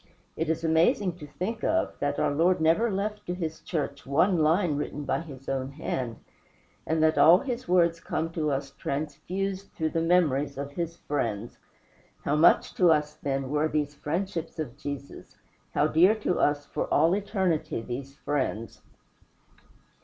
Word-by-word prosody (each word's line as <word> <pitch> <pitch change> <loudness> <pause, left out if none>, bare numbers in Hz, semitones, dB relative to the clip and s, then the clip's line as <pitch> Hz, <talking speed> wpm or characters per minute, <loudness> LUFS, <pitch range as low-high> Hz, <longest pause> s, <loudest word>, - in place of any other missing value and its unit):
It 160 0 -2
is 165 0 -1
amazing 165 +3 +2
to 150 - -8
think 215 +10 -4
of, 325 0 +1
that 145 0 -1
our - - +1
Lord 175 +5 +3
never 165 +9 +3
left 210 +1 -2
to 175 - -2
his 160 -3 -4
church 145 -4 -3
one 165 +6 +2
line 160 +1 +3
written 145 0 -4
by - - 0
his 135 -5 -11
own 135 0 -2
hand, 130 -5 -3 0.7
and 160 0 +1
that 160 0 +3
all 170 +3 +8
his 250 +2 -4
words 170 -2 +3
come 165 0 -3
to 155 -2 -1
us 140 0 -2
transfused 165 +8 -4
through 160 -1 -1
the 165 - 0
memories 150 -5 +2
of 140 0 -4
his 170 +2 -4
friends. 115 -6 -3 0.6
How 145 - +1
much 155 +3 +4
to 180 - +5
us, 150 -1 +1
then, 135 -3 -3
were 150 +1 +2
these 150 -2 -1
friendships 165 +3 -3
of 145 -6 -4
Jesus 140 -1 -8 0.4
how 145 - +4
dear 175 +7 +5
to 210 -4 -1
us, 145 0 +2
for - - -4
all 165 +4 +4
eternity, 190 - 0
these 135 +4 -6
friends! 130 -7 -3
160 Hz, 165 wpm, -27 LUFS, 145-175 Hz, 0.7 s, all